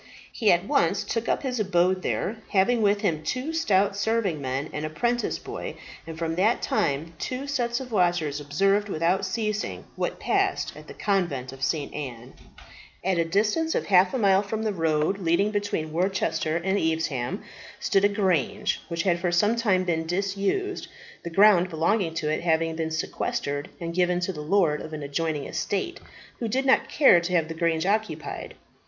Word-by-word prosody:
He 220 - +3
at 175 +2 +2
once 165 - +2
took 230 0 -2
up - - 0
his 250 -3 -2
abode 185 -2 +2
there, 215 +4 -2
having 220 +5 +3
with 205 -1 +3
him 165 -7 0
two 255 - -3
stout 200 -11 +2
serving 205 -6 0
men, 135 +2 -2
and 150 - -3
a 155 - -2
'prentice 240 +9 -1
boy; - - -6 0.3
and 165 -1 -7
from 165 0 -2
that 215 +6 +3
time 160 +2 0
two 255 +2 -3
sets 245 -4 -1
of 255 -2 -8
watchers 175 -7 +1
observed 195 +8 +1
without 185 +3 +1
ceasing 215 -1 -3
what - - -3
passed - - 0
at - - -12
the - - -10
Convent 170 -11 -1
of 135 0 -9
St. 145 +1 -1
Anne. 125 -4 -7 0.7
At 185 -2 +1
a - - +4
distance 215 - +1
of - - 0
half 185 -1 +5
a - - -1
mile 195 -4 +4
from 215 +2 -4
the 215 -2 0
road 160 +2 +1
leading 185 +4 +2
between 205 -7 -2
Worcester 180 -3 0
and 190 +3 0
Evesham, 160 -6 -1 0.4
stood 195 - +2
a 205 - +5
grange, 190 - 0
which 170 0 -2
had 175 -3 +2
for 175 0 0
some 205 +6 +3
time 205 -6 +2
been 160 -2 -1
disused, 200 - -1 0.3
the 170 - -6
ground 185 0 +5
belonging 165 +1 0
to 155 - -2
it 155 - 0
having 165 -1 +1
been 160 0 -2
sequestrated 145 -2 -3
and 170 -1 -4
given 180 0 +2
to 185 +1 -1
the 150 - -6
lord 160 -2 +2
of 160 - -8
an 150 -1 -5
adjoining 150 0 -2
estate, 275 - -3 0.4
who 235 - -2
did 260 +5 0
not 265 - +3
care 270 - +6
to 170 +2 -3
have 165 -3 +2
the 165 - -5
grange 165 0 0
occupied. 215 +2 -2
180 Hz, 185 wpm, -26 LUFS, 160-205 Hz, 0.7 s, care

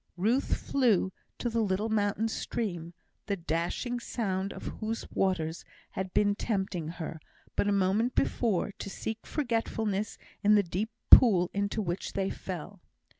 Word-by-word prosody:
Ruth 230 +9 +2
flew 230 -9 +2 0.3
to - - -2
the 230 -1 +1
little 205 +1 0
mountain 210 0 +1
stream, 175 -7 -3 0.3
the 200 - +1
dashing 175 +8 -2
sound 195 -5 -2
of - - -8
whose 225 +1 -3
waters 170 -4 0 0.3
had 190 -1 -4
been 205 +1 +3
tempting 190 -6 -2
her, 165 -1 -5 0.4
but - - +1
a - - +3
moment 200 +5 +2
before, 210 -6 +1
to - - -5
seek 220 +3 -5
forgetfulness 225 -6 -1 0.3
in 210 +1 +6
the 205 - +5
deep 190 +5 -2 0.2
pool 185 -8 +8
into 200 +2 -1
which 175 0 -3
they 195 -1 0
fell. 185 +1 -7
200 Hz, 145 wpm, -30 LUFS, 185-225 Hz, 0.4 s, pool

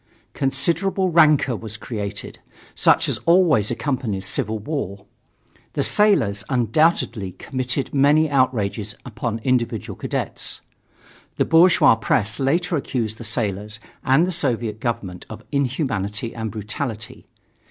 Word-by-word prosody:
Considerable 170 +8 +1
rancor 150 -6 +4
was 110 -1 -6
created, 105 -3 -5 0.3
such - - +3
as - - -1
always 165 - +4
accompanies 120 -7 -2
civil 110 -1 0
war. 105 - -5 0.7
The - - 0
sailors 115 - +2
undoubtedly 120 - +1
committed 130 +4 -3
many 145 +3 +4
outrages 115 -7 0
upon 115 -1 -4
individual 120 -4 -1
cadets. - - -3 0.8
The - - +1
bourgeois 165 -5 +6
press 110 -1 0
later 165 +6 +1
accused 115 -5 -3
the - - -7
sailors 105 -2 -2 0.2
and 135 +6 +4
the 185 - -2
Soviet 120 - -1
government 100 -7 -4
of 110 0 -9
inhumanity 120 - -1
and 110 -1 -4
brutality. 110 +2 -5
120 Hz, 115 wpm, -22 LUFS, 105-145 Hz, 0.8 s, bourgeois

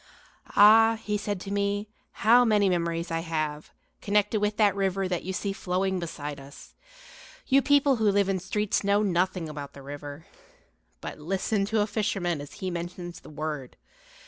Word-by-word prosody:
Ah, 225 +2 +7
he 210 - -1
said 205 -1 -3
to 195 - -7
me, 200 +1 -1 0.4
how 240 +3 +7
many 210 -4 +3
memories 170 -1 -1
I 165 - 0
have, 155 -2 -3 0.3
connected 210 +1 +1
with 210 0 0
that 205 -3 +3
river 195 -1 0
that 180 -2 -2
you 190 - -4
see 195 +1 -2
flowing 190 0 -1
beside 150 -4 -6
us! 140 +1 -13 0.7
You 275 0 +4
people 285 -1 +3
who 220 -2 +3
live 200 -1 +2
in 195 -1 0
streets 205 +3 -1
know 200 +1 +2
nothing 185 -2 0
about 145 -2 -7
the 140 - -12
river. 145 +2 -8 0.8
But - - -7
listen 195 +5 -1
to 215 +1 +1
a - - +2
fisherman 195 -7 -1
as 145 - -10
he 185 -1 -4
mentions 175 0 -6
the - - -14
word. 150 -3 -5
190 Hz, 170 wpm, -27 LUFS, 165-210 Hz, 0.8 s, Ah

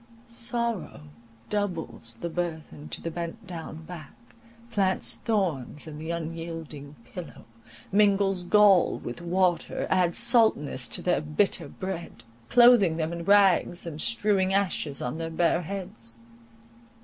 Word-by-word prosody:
Sorrow 235 - -3 0.5
doubles 165 - -2
the 170 - -2
burthen 160 -3 -5
to - - -5
the 165 - -3
bent 170 +6 -6
down 165 -3 -8
back; 160 -5 -10 0.6
plants 190 -3 +1
thorns 170 - -2
in 155 -1 -8
the 160 +1 -6
unyielding 165 -3 -6 0.2
pillow; 180 -3 -9 0.5
mingles 195 -2 +3
gall 200 0 +5
with 120 +7 -7
water; 175 0 0
adds 180 -2 +2
saltness 220 - +3
to - - -1
their 180 -3 +1
bitter 155 +7 0
bread; 175 -10 -7 0.3
cloathing 240 - +6
them 160 0 -2
in 170 0 -5
rags, 195 -3 +4
and 155 -2 -5
strewing 190 - +2
ashes 175 -7 0
on 125 +6 -3
their 165 0 -3
bare 170 +1 +1
heads. 170 -11 -6
175 Hz, 125 wpm, -27 LUFS, 160-200 Hz, 0.6 s, cloathing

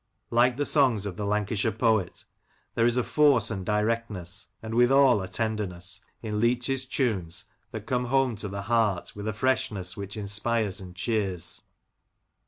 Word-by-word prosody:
Like 120 +1 +3
the 145 - 0
songs 130 -10 +3
of 100 -3 -4
the 105 +1 -3
Lancashire 105 +1 0
poet, 110 -4 0 0.5
there 115 - +3
is 120 +1 +2
a 125 - +2
force 140 -8 +3
and 95 -3 -3
directness, 105 -3 -2 0.2
and 110 0 -5
withal 125 -1 +5
a 95 - -4
tenderness, 100 -2 -3 0.2
in 105 -2 -2
Leach's 125 +3 +1
tunes 100 - -1 0.2
that - - -7
come 125 -1 0
home 130 -1 +2
to 105 - -3
the 100 0 -5
heart 110 -4 0
with 105 +1 -6
a 110 - -1
freshness 105 -6 -1
which 100 +2 -6
inspires 105 0 -1
and 90 -2 -10
cheers. 95 -4 -2
110 Hz, 160 wpm, -27 LUFS, 100-120 Hz, 0.5 s, withal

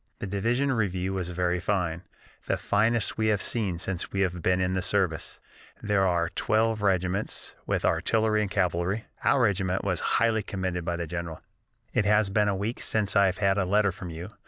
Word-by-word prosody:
The - - -5
division 115 +8 0
review 95 -4 -1
was 90 -2 -3
very 90 0 0
fine, 90 -3 -1 0.5
the - - +1
finest 110 +2 +1
we 110 - +2
have 105 -2 +2
seen 100 -4 0
since 90 0 -3
we 95 - -1
have 90 -2 -1
been 90 +2 +2
in 90 0 0
the 95 - 0
service. 90 -3 -1 0.4
There 100 -2 +1
were 85 -2 0
twelve 110 0 +1
regiments, 95 +1 -1
with - - 0
artillery 110 -1 +2
and 105 - -1
cavalry. 95 +2 0 0.2
Our 130 - +3
regiment 95 -3 +1
was 90 -4 -1 0.2
highly 110 0 +2
commended 95 -3 -3
by 85 0 -2
the 85 0 -3
general. 85 -1 -6 0.5
"It 105 - +2
has 105 -1 +3
been 105 +1 +2
a 100 - +1
week 105 +5 -3
since 105 -2 0
I 100 -1 +6
have 95 0 -1
had 100 -1 +2
a 95 - +1
letter 100 +1 +2
from 90 -1 -8
you. 85 +5 -7
95 Hz, 195 wpm, -27 LUFS, 90-105 Hz, 0.5 s, I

